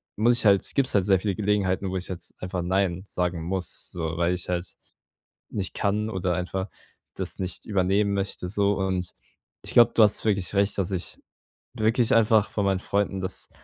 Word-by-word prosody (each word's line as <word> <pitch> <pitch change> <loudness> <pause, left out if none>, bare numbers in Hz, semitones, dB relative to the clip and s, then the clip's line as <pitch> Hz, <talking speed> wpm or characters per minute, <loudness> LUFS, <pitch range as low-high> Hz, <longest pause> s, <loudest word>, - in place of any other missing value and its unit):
muss 115 +3 +4
ich - - -2
halt 100 -2 +4
gibt's 135 -5 +1
halt 95 -3 +3
sehr 95 -2 +4
viele 100 0 -1
Gelegenheiten, 100 -2 0
wo 95 - -2
ich 90 - -6
halt 90 -2 -8
einfach 90 -1 -3
„Nein“ 95 0 0
sagen 90 -3 -2
muss, 90 0 -3
so 80 -1 -4
weil 85 +1 +2
ich 90 0 -5
halt 90 0 -1 0.9
nicht 100 -3 -3
kann 105 +2 0
oder 95 -3 -1
einfach 95 +3 -3 0.5
das - - -2
nicht 90 -1 -4
übernehmen 100 0 +1
möchte, 100 -2 -2
so 100 +1 +1
und 95 -2 -2 0.5
ich - - -4
glaube, 120 0 +7
du 115 - +5
hast 105 0 +5
wirklich 100 -4 0
recht, 100 +1 +2
dass 95 0 -1
ich 90 -2 -3 0.6
wirklich 110 +2 +2
einfach 110 -2 +4
von 100 - -1
meinen 95 -1 +1
Freunden 100 0 -1
das 95 0 -6
95 Hz, 190 wpm, -25 LUFS, 90-105 Hz, 0.9 s, glaube